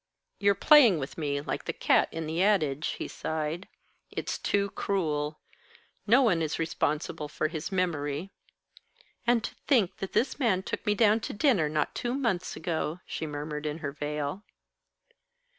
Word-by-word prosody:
"You're 200 0 +4
playing 245 - +7
with 135 -2 -5
me 145 -3 -1
like - - -4
the - - -2
cat - - +3
in 165 0 -4
the 160 +3 -1
adage," 160 -8 +2
he - - -4
sighed. 160 +3 -3 0.4
"It's - - -4
too 200 -1 0
cruel. 155 -6 -1 0.7
No 245 +6 +6
one 180 -9 +3
is 155 -1 -1
responsible 155 -2 -1
for 155 +1 -1
his 165 +3 -5
memory." 170 -2 -1 1.0
"And 235 -2 +3
to - - -4
think 220 -10 +3
that 195 - -5
this 270 - +1
man 205 -8 +2
took - - -5
me 210 - +3
down 215 0 +4
to - - -5
dinner 205 - +3
not 150 -1 0
two 240 +1 -2
months 225 -10 -1
ago!" 160 0 -2
she 160 - -4
murmured 150 +1 -4
in 150 +1 -3
her 140 - -2
veil. 150 +5 -3
165 Hz, 160 wpm, -29 LUFS, 150-205 Hz, 1.0 s, playing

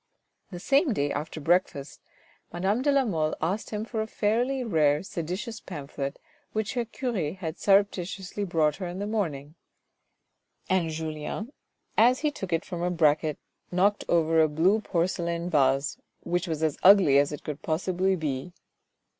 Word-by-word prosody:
The 175 - -7
same 275 - +3
day 145 -5 0
after 155 +2 -4
breakfast 155 -3 0 0.5
madame 190 +7 0
de 285 +2 +2
la 275 -1 +3
Mole 160 -7 0
asked 185 +7 -2
him 210 0 -3
for 225 -1 -3
a 220 - -3
fairly 240 +6 0
rare, 150 -8 +2
seditious 190 +6 -5
pamphlet 140 -1 -6 0.4
which 220 -1 -2
her 240 -2 -1
cure 225 - -3
had 170 -3 -6
surreptitiously 195 -1 +1
brought 155 -5 +1
her 185 -1 -4
in 175 +1 -6
the 200 - -3
morning, 160 -10 -3 1.1
and 185 -3 +1
Julien, 160 - -5 0.5
as 245 +3 +5
he 300 -1 +1
took 190 -10 -7
it 165 0 0
from 175 -2 -5
a 175 - +1
bracket, 155 -3 +2 0.3
knocked 200 +3 +2
over 165 -1 +3
a 155 - +4
blue 180 +8 +2
porcelain 170 -2 -1
vase 135 -1 +2 0.2
which 175 +1 -1
was 160 -1 -2
as 155 -3 0
ugly 185 -8 +7
as 145 +1 +1
it 150 - -7
could 150 0 -6
possibly 185 +4 0
be. 155 0 -4
175 Hz, 160 wpm, -27 LUFS, 155-205 Hz, 1.1 s, ugly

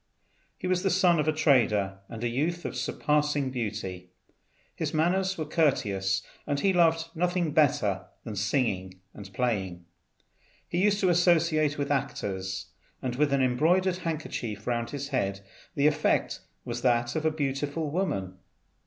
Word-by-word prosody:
He - - -7
was 180 0 +1
the 195 - +1
son 180 -3 +4
of 150 - 0
a - - +4
trader, 110 -10 +2
and 115 0 -7
a - - +2
youth 160 +9 -1
of - - -4
surpassing 150 -2 0
beauty. 105 -7 -4 0.7
His - - -3
manners 185 +4 +1
were 155 - -2
courteous, 100 - +1 0.2
and 140 - 0
he 195 +5 +2
loved 165 -1 +2
nothing 175 -1 0
better 105 - +2 0.2
than 110 - -6
singing 100 -4 -1
and 100 -2 -10
playing. 95 -6 -2 0.8
He 175 - -1
used 205 0 +3
to 185 - +3
associate 165 -4 +3
with 140 0 -2
actors, 95 -9 -3 0.3
and 125 -2 -3
with 145 +1 +2
an 140 -1 +3
embroidered 175 +9 +2
handkerchief 145 - -4
round 120 -1 -1
his 140 -1 -5
head 100 -8 -1 0.3
the 140 - +2
effect 150 0 +2 0.3
was 120 0 -4
that 120 -1 +2
of 160 - -1
a 160 - +3
beautiful 145 +1 -2
woman. 95 - -2
140 Hz, 155 wpm, -28 LUFS, 105-165 Hz, 0.8 s, son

